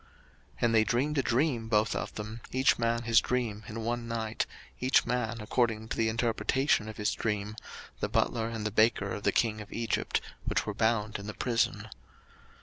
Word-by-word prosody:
01:040:005 - - -27 0.5
And 115 -1 +3
they 110 -1 +6
dreamed 135 +8 0
a - - +5
dream 120 -3 +1
both 105 -1 +2
of - - -3
them, 110 +2 -6
each 130 -1 +3
man 115 0 +1
his 115 -1 +5
dream 115 -4 -1
in 115 +1 -5
one 120 +1 -2
night, 110 -1 -2 0.3
each 130 +1 +3
man 115 -2 -1
according 110 0 0
to - - -2
the 110 0 +2
interpretation 115 +1 +1
of 110 - -8
his 105 0 0
dream, 105 -1 -2 0.4
the - - -1
butler 115 -2 +1
and 115 -2 -4
the 110 - 0
baker 110 -2 +3
of - - -4
the - - +2
king 110 -2 +1
of 105 - -11
Egypt, 115 0 0 0.2
which - - 0
were 105 - -2
bound 110 -1 +1
in 100 - -8
the 105 - -5
prison. 120 -2 0
115 Hz, 195 wpm, -30 LUFS, 110-120 Hz, 0.5 s, they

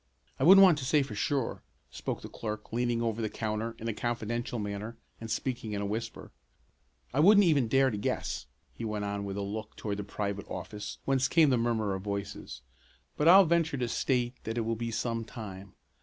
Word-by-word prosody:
"I - - 0
wouldn't 195 +5 +9
want 175 -6 +6
to - - -5
say 145 +3 +3
for 135 -5 -7
sure," 130 +4 -1 0.3
spoke - - -5
the - - -6
clerk, 110 -1 -6
leaning 120 0 0
over 115 0 -1
the 110 - -1
counter 110 +1 -3
in 115 - -6
a 115 - -1
confidential 120 +1 -3
manner 105 +2 -5 0.2
and 115 - -7
speaking 120 -3 -3
in 100 - -2
a - - -1
whisper. 110 +3 -5 0.8
"I 135 - +1
wouldn't 205 +6 +7
even 145 -8 +3
dare 135 +3 +3
to 105 - -3
guess," - - -2 0.3
he - - -8
went 105 -2 -2
on 100 0 -3
with 100 0 -4
a - - -2
look 105 +2 -5
toward 100 -2 -4
the 105 - -3
private 100 0 -4
office 100 +3 -6
whence 135 -1 +2
came 160 -4 +4
the 125 - +3
murmur 115 -4 0
of 95 - -4
voices, 100 0 -5 0.5
"but 150 - +1
I'll 190 +3 +9
venture 165 -3 +1
to 125 -2 -1
state 125 0 0
that 110 +1 -4
it - - +1
will 115 0 -1
be 115 +1 -3
some 115 0 -2
time. 100 -4 -9
115 Hz, 210 wpm, -30 LUFS, 105-130 Hz, 0.8 s, wouldn't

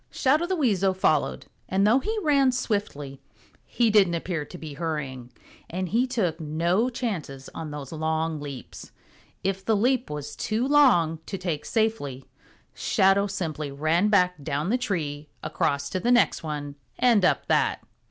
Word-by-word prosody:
Shadow 300 +6 +2
the 375 - 0
Weasel 195 - +2
followed, 145 - +1 0.2
and 195 +1 +2
though 230 +5 +5
he 435 +10 -3
ran 280 -4 +4
swiftly, 200 - -3 0.5
he 235 -2 +2
didn't 195 -5 +4
appear 165 -2 -3
to 175 - -10
be 155 -3 -8
hurrying, 140 -6 -4 0.4
and 185 +1 -3
he 240 +6 +2
took 190 -10 -1
no 170 +9 +1
chances 170 - -4
on 160 -1 -6
those 145 -3 -7
long 160 0 -1
leaps. 140 -3 -9 0.5
If 195 0 -1
the 220 +2 +2
leap 250 +4 +1
was 150 0 -6
too 225 +4 -1
long 240 - +4
to 195 - -4
take 175 -5 -3
safely, 215 - -1 0.5
Shadow 195 +1 +3
simply 160 -6 -4
ran 155 +7 +1
back 180 -6 +2
down 145 +8 -1
the 250 - +3
tree, 150 -10 -3
across 140 0 -1
to 185 - -1
the 240 +7 +1
next 245 0 +3
one 145 -2 -5 0.2
and 235 -6 +4
up 180 - +2
that. - - +1
180 Hz, 160 wpm, -26 LUFS, 150-220 Hz, 0.5 s, though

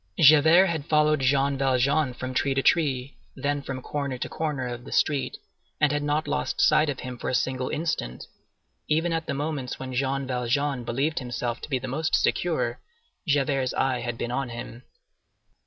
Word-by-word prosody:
Javert 160 +4 +7
had 160 -5 -2
followed 150 0 +3
Jean 135 +1 +2
Valjean 135 +1 +2
from 130 +1 -5
tree 135 +1 +1
to 135 - +1
tree, 140 -5 +1 0.2
then 145 0 -1
from 130 -2 -6
corner 140 -3 -3
to - - -3
corner 150 -5 -3
of 120 0 -6
the - - -11
street, 145 -3 +1 0.4
and 150 - +4
had 145 0 0
not 150 +2 0
lost - - -2
sight 155 0 +4
of 140 - -3
him 125 -1 -7
for - - -3
a - - 0
single 130 0 -1
instant; 155 - -3 0.6
even 165 +3 +1
at 165 -1 -2
the - - -2
moments 140 -3 -3
when 130 -1 -6
Jean 135 +1 0
Valjean 130 +1 -1
believed 135 +7 -1
himself 120 -1 -4
to - - -8
be 135 - +1
the 130 +1 -6
most 155 +5 0
secure - - 0 0.5
Javert's 135 -3 +1
eye 130 -2 +1
had 120 -1 -4
been 120 - -3
on 135 0 -2
him. 120 0 -8
135 Hz, 185 wpm, -26 LUFS, 130-150 Hz, 0.6 s, Javert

